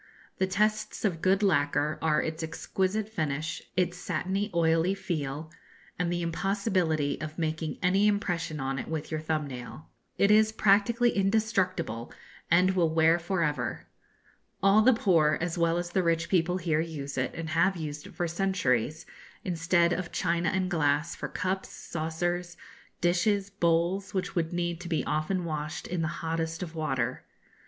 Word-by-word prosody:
The 190 - +2
tests 215 +3 0
of 170 -6 0
good 190 +2 +3
lacquer 150 -4 +2
are 155 -1 +2
its 160 +1 -4
exquisite 190 +6 -1
finish, 155 -7 -3 0.2
its 180 -1 +1
satiny, 190 +4 -2
oily 165 +2 +2
feel, 155 -5 -4 0.5
and 175 -1 0
the 175 0 -1
impossibility 175 -4 0
of 155 0 -6
making 160 -1 -2
any 195 +3 +4
impression 175 -7 -1
on 135 0 -2
it - - -5
with 160 -1 -4
your 155 - -1
thumb 155 -1 -1
nail. 130 +3 -8 0.3
It 200 - +4
is 215 +1 +5
practically 220 +3 +3
indestructible, 195 - 0 0.4
and 180 +2 +5
will 175 -4 +2
wear 165 +1 +4
for 175 +1 -1
ever. 150 -5 -2 0.8
All 195 +2 +6
the 250 +4 +6
poor 165 -8 +3
as 175 0 -2
well 170 -1 +2
as 175 0 -3
the 190 - +2
rich 165 -1 +1
people 180 -1 +2
here 165 -3 +1
use 145 -4 -5
it, - - -2
and 165 -1 -5
have 175 +4 +2
used 150 -2 -5
it - - -14
for 175 - -1
centuries, 160 - 0 0.4
instead 170 -1 +2
of 180 -1 -3
china 170 -1 0
and 190 -1 -1
glass, 150 0 +1
for - - -4
cups, 190 +2 -2
saucers, 175 +2 -3 0.4
dishes, 195 +3 +2
bowls, 180 +1 +1
which 190 - -1
would 165 -2 0
need 175 -1 -2
to 175 - -7
be 160 - 0
often 160 +4 -1
washed 155 -1 -4
in 180 -1 -2
the 160 - 0 0.2
hottest 165 +1 -2
of 165 -2 -7
water. 130 -6 -2
170 Hz, 165 wpm, -28 LUFS, 160-190 Hz, 0.8 s, All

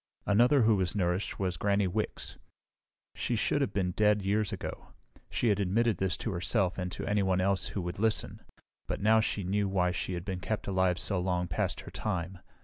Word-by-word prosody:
Another 120 +6 +4
who 110 -2 +4
was 90 -1 -1
nourished 90 0 -1
was 90 -2 -1
Granny 100 0 +2
Wicks. 105 +4 -3 0.8
She - - -2
should - - +1
have - - 0
been 95 -2 0
dead 105 +1 +2
years 105 +2 +1
ago. - - -6 0.4
She 120 - +1
had 100 -1 +2
admitted 105 +2 +1
this 95 -1 0
to 115 - 0
herself 90 +1 0
and 90 0 -3
to - - -5
anyone 95 -3 +1
else 95 +1 +1
who 100 - -4
would 90 +2 -5
listen, 110 0 0 0.5
but - - -2
now 110 +2 +4
she 105 -2 -1
knew 100 +2 0
why 90 -2 +1
she 90 - -3
had 85 0 -4
been 95 -2 -3
kept 110 +4 -3
alive 95 -2 +1
so 100 -1 +1
long 90 -1 0
past 80 - -2
her - - -10
time. 90 -3 -3
95 Hz, 200 wpm, -30 LUFS, 90-105 Hz, 0.8 s, Another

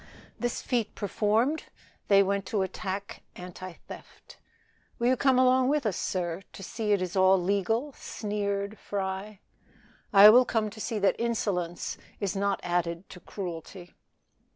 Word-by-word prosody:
This 240 0 -2
feat 235 -4 -1
performed, 220 - 0 0.4
they 200 -1 +6
went 195 0 -1
to 200 -2 0
attack 190 +1 -5
anti 180 0 -8
theft. - - -12 0.6
"Will 240 +1 +2
you 260 - +4
come 265 0 +3
along 255 0 +4
with 290 -1 +1
us, 210 - 0
sir, 175 -1 -2
to 195 - -9
see 215 +2 -3
it 200 -3 +2
is 180 +1 -5
all 190 0 +5
legal?" 205 +9 0
sneered 205 -2 -3
Fry. 195 +1 -4 0.7
"I 205 +1 +10
will 250 +3 +7
come 220 -3 -1
to 220 +1 -9
see 225 +2 -2
that 200 -1 +3
insolence 195 -7 -2 0.2
is 200 -1 -2
not 200 0 0
added 175 0 -2
to 180 - -10
cruelty." 175 0 -8
200 Hz, 150 wpm, -28 LUFS, 190-225 Hz, 0.7 s, I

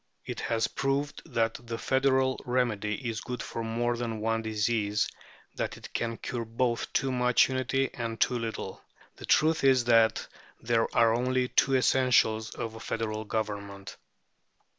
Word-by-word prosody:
It - - -5
has 115 -1 0
proved 140 +1 -2
that 115 -1 0
the 115 0 -3
federal 130 0 +1
remedy 120 -1 -1
is 110 -2 -3
good 125 0 -5
for 115 - -5
more 120 +2 -1
than 115 -2 -3
one 115 +1 0
disease, 110 -1 0 0.5
that - - -3
it - - -12
can 115 -1 -2
cure 120 -2 -4
both 115 +1 -1
too 135 - 0
much 125 0 +3
unity 130 +1 0
and 115 -2 -4
too 125 - +2
little. 110 -4 -5 0.4
The - - -8
truth 160 0 +3
is 130 -2 +5
that 115 -2 +3 0.3
there 115 -1 +1
are 115 -1 +5
only 125 +1 +1
two 135 - +3
essentials 120 -4 +3
of 115 -1 -4
a 110 - -9
federal 110 -1 -3
government. 100 -3 -4
115 Hz, 155 wpm, -29 LUFS, 110-125 Hz, 0.5 s, is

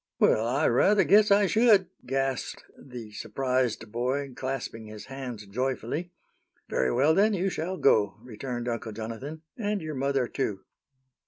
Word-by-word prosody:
"Well, 110 +1 +4
I 135 +6 +2
rather 195 - +4
guess 210 +1 +5
I 200 0 +5
should!" 215 -2 +4 0.2
gasped 135 0 -2
the 120 -5 -10
surprised 125 -1 -1
boy, 130 +4 -2
clasping 130 -4 -4
his 105 0 -9
hands 130 -5 -7
joyfully. 130 - -3 0.6
"Very 65 -1 +1
well, 145 +6 +4
then, 205 +4 +3
you 190 +1 0
shall 180 +4 -3
go," 105 - +3
returned 120 0 -5
Uncle 115 -2 -3
Jonathan, 115 +9 -6 0.2
"and 210 -1 -1
your 155 -3 -5
mother, 135 -2 0
too." 105 -9 -3
130 Hz, 145 wpm, -27 LUFS, 115-160 Hz, 0.6 s, guess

